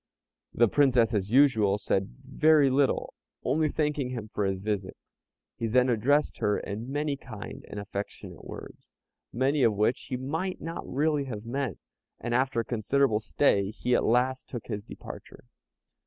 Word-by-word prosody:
The 120 - +4
Princess, 125 -3 +3
as 100 -2 0
usual, 110 -6 +4
said 100 -1 0 0.2
very 150 0 +4
little, 135 +1 +1 0.3
only 155 +4 +1
thanking 150 -3 -1
him 115 -4 -5
for 105 - 0
his 95 -1 -1
visit. 100 -1 -3 0.6
He 115 - -1
then 125 +3 +3
addressed 130 +6 +2
her 105 - +1
in 110 +6 -5
many 145 0 -1
kind 110 -6 -9
and 105 - -6
affectionate 100 0 -7
words, - - -10 0.4
many 135 +4 +1
of 115 -4 +4
which 105 +4 0
he 125 - -1
might 160 +9 -3
not 165 +1 -6
really 145 +1 +1
have 110 -4 -6
meant, 130 - -2 0.4
and 120 - -3
after 130 -1 +2
a - - -8
considerable 120 0 +1
stay 100 -4 +2
he 120 +3 -2
at - - +3
last 125 +3 +1
took 120 -4 -6
his 105 -3 -4
departure. - - -10
125 Hz, 160 wpm, -28 LUFS, 105-140 Hz, 0.6 s, The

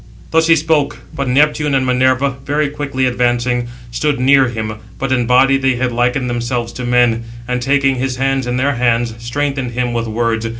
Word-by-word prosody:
Thus 160 0 +3
he 165 - +6
spoke; 155 -2 0 0.2
but 140 -1 -3
Neptune 150 +2 +2
and 130 -1 +1
Minerva, 130 +2 +2
very 145 +1 0
quickly 140 -3 -2
advancing, 120 0 0 0.2
stood 145 +3 -1
near 135 +1 +4
him 110 -2 -5 0.2
(but 135 0 -3
in 125 -3 +1
body 135 +2 +4
they 130 -1 +1
had 125 0 -1
likened 125 +2 0
themselves 120 0 -3
to 125 - -5
men), 120 -1 +2 0.2
and, 125 0 -2
taking 135 0 +2
his 130 0 -2
hand 135 0 -1
in 125 0 -1
their 140 +2 +1
hands, 120 -2 +1
strengthened 135 +1 -3
him 125 0 -1
with 115 -1 -2
words. 115 0 -1
125 Hz, 185 wpm, -16 LUFS, 120-135 Hz, 0.2 s, he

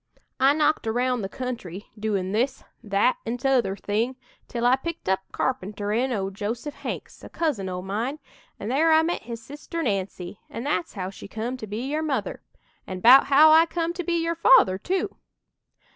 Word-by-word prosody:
I 270 +2 +5
knocked 300 -4 +1
aroun' 245 +2 0
the 195 - -4
country, 215 -6 -6
doin' 205 -4 -2
this, 255 +6 0 0.2
that 205 +4 +2
an' 230 +2 -3
t'other 245 -7 +1
thing 220 +6 -1 0.3
till 240 0 -3
I 245 +1 +6
picked 335 - -6
up 190 0 +2
carpenterin' 215 +1 -1
o' 195 -4 -2
Joseph 225 +8 -4
Hanks, - - -7
a - - -9
cousin 280 - -1
o' 180 0 -4
mine, 225 +9 -2 0.4
an' 205 - -4
there 310 +6 +3
I 315 0 +6
met 345 +2 -1
his 230 0 -8
sister 300 +4 -6
Nancy, 195 - -3
an' 230 - -6
that's 300 +4 -1
how 190 -2 -4
she 195 - -11
come 225 +5 -4
to 220 - -7
be 210 +3 -4
your 295 +4 -2
mother 315 - -2 0.5
an' 185 -1 -5
'bout 250 +7 +8
how 300 +3 +7
I 325 +1 +7
come 335 0 -2
to 360 0 -4
be 345 - -1
your 335 0 0
father, 265 - +5
too!" 370 - -2
245 Hz, 185 wpm, -25 LUFS, 205-295 Hz, 0.5 s, bout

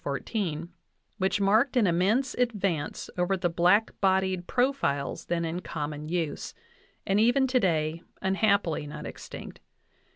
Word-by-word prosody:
14), 165 +2 -3 0.5
which 190 +2 +1
marked 220 +7 +3
an 235 - +5
immense 200 +9 +2
advance 200 -11 -1
over 185 +2 +1
the 175 -1 0
black 180 +6 +3
bodied 190 -2 +1
profiles 245 - 0
then 170 -1 -1
in 165 +2 -3
common 150 -3 -5
use, 165 -3 -3 0.5
and 195 +1 +2
even 245 +5 +4
today 170 -11 +1 0.2
unhappily 190 -5 +1
not 150 +1 -7
extinct. - - -9
185 Hz, 125 wpm, -28 LUFS, 165-215 Hz, 0.5 s, an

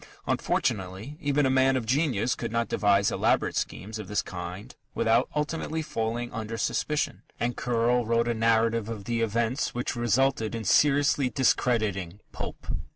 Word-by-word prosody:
Unfortunately, 95 +8 -1
even 145 -1 +2
a 130 - +2
man 130 0 +4
of 120 - -3
genius 125 -3 +1
could 115 - -5
not 115 0 0
devise 100 -1 +2
elaborate - - +1
schemes 110 +3 -3
of 105 - -7
this 105 +1 0
kind 90 +7 -7 0.2
without 115 0 +2
ultimately 160 +1 -2
falling 120 -2 -3
under 115 -1 -4
suspicion, 150 +5 -1 0.2
and 120 +1 -1
Curll 120 0 +1
wrote 115 0 +2
a 120 - +1
narrative 115 0 +2
of 110 -3 -5
the 115 +2 -1
events 115 +4 0
which 120 0 -2
resulted 120 -1 +1
in 115 - -4
seriously 145 +2 +3
discrediting 110 -7 +1
Pope. - - -7
115 Hz, 155 wpm, -27 LUFS, 110-130 Hz, 0.2 s, man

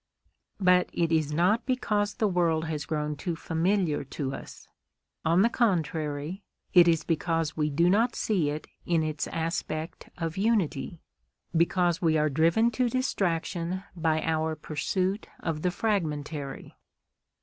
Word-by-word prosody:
But 180 -2 +4
it 170 -1 0
is 155 -2 +2
not 185 - +2
because 210 -5 0
the 215 - +1
world 170 -4 +1
has 155 -2 -4
grown 150 -1 -2
too 165 +4 -3
familiar 165 0 0
to 135 0 -4
us; - - -10 0.6
on 170 +4 +4
the - - +5
contrary, 160 - -1 0.3
it 175 -2 +8
is 165 -2 +3
because 165 -1 -1
we 150 -1 0
do 165 +4 +2
not 225 +6 +3
see 180 -9 +1
it 150 +1 -4 0.2
in 165 -2 +1
its 155 -1 -2
aspect 165 -1 -4
of 165 0 -3
unity, 190 - 0 0.5
because 175 +1 +2
we 160 -2 +3
are 155 0 +2
driven 165 - +3
to 245 +1 +1
distraction 185 -7 -1
by 160 -2 +1
our 160 0 0
pursuit 185 +7 -2
of 160 -3 -3
the 180 - +2
fragmentary. 155 -8 -3
165 Hz, 140 wpm, -28 LUFS, 155-190 Hz, 0.6 s, it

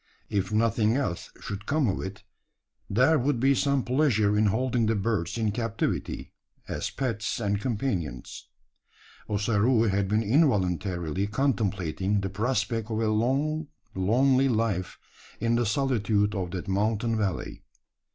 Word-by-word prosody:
If 100 0 -1
nothing 110 0 +2
else 110 -12 -2
should 100 +1 -6
come 145 -2 +2
of 95 - -1
it, 95 +1 -7 0.7
there 130 +9 +4
would 130 0 0
be 135 +3 +4
some 140 -1 +1
pleasure 125 -6 +2
in 105 0 +3
holding 120 +2 +1
the 110 - +2
birds 100 -3 -1
in 110 -2 +1
captivity 115 0 -3 0.3
as - - -3
pets 115 -6 -2
and 100 -2 -1
companions. 100 - -3 0.8
Ossaroo 110 +3 +2
had 100 0 +1
been 105 +3 +1
involuntarily 95 - +1
contemplating 100 - 0
the 95 -1 -3
prospect 110 +1 -1
of 110 -1 -1
a 110 -1 +1
long 140 +8 0 0.3
lonely 130 +8 +3
life 110 -6 -1 0.4
in 115 +1 +1
the 120 -1 +2
solitude 105 -4 +1
of 95 -4 -2
that 90 0 -5
mountain 110 +4 0
valley. 100 -6 -2
110 Hz, 135 wpm, -27 LUFS, 100-125 Hz, 0.8 s, there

